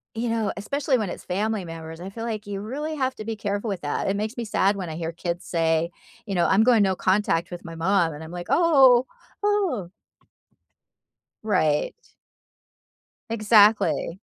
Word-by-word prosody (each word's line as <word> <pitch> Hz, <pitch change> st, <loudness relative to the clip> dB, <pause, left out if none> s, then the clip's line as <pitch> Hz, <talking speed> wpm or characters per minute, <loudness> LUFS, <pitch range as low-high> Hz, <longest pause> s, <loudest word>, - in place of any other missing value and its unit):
you 235 Hz, +2 st, -2 dB
know, 225 Hz, -2 st, 0 dB
especially 275 Hz, +5 st, 0 dB
when 210 Hz, -5 st, -2 dB
it's -, -, -7 dB
family 205 Hz, +2 st, -1 dB
members, 165 Hz, 0 st, -8 dB
I 190 Hz, -, -6 dB
feel 225 Hz, +3 st, -6 dB
like 215 Hz, -2 st, -4 dB
you 200 Hz, -1 st, -5 dB
really 295 Hz, +8 st, -4 dB
have 260 Hz, -1 st, -1 dB
to 215 Hz, -, -7 dB
be 225 Hz, -1 st, -3 dB
careful 205 Hz, +2 st, -2 dB
with 195 Hz, -3 st, -3 dB
that. 145 Hz, +6 st, -2 dB
It 200 Hz, -, 0 dB
makes 215 Hz, +3 st, -3 dB
me 235 Hz, -, -2 dB
sad 200 Hz, -1 st, +2 dB
when 185 Hz, -4 st, -5 dB
I 155 Hz, -, -5 dB
hear 165 Hz, 0 st, -4 dB
kids 175 Hz, +1 st, -4 dB
say, 165 Hz, 0 st, +1 dB, 0.4 s
you 200 Hz, -3 st, -3 dB
know, 170 Hz, -1 st, +3 dB
"I'm 200 Hz, +4 st, +4 dB
going 235 Hz, -4 st, +5 dB
no 190 Hz, -1 st, +1 dB
contact 185 Hz, -3 st, +1 dB
with 175 Hz, -1 st, -8 dB
my 165 Hz, -1 st, -8 dB
mom," 170 Hz, -1 st, +1 dB
and 150 Hz, -, -9 dB
I'm 160 Hz, -, -9 dB
like, 175 Hz, 0 st, -7 dB
"Oh, 270 Hz, -7 st, +5 dB, 0.4 s
ooh." 350 Hz, -, 0 dB, 1.5 s
Right. 155 Hz, -8 st, +1 dB, 1.4 s
Exactly. 215 Hz, -4 st, +3 dB
200 Hz, 180 wpm, -24 LUFS, 175-225 Hz, 1.5 s, going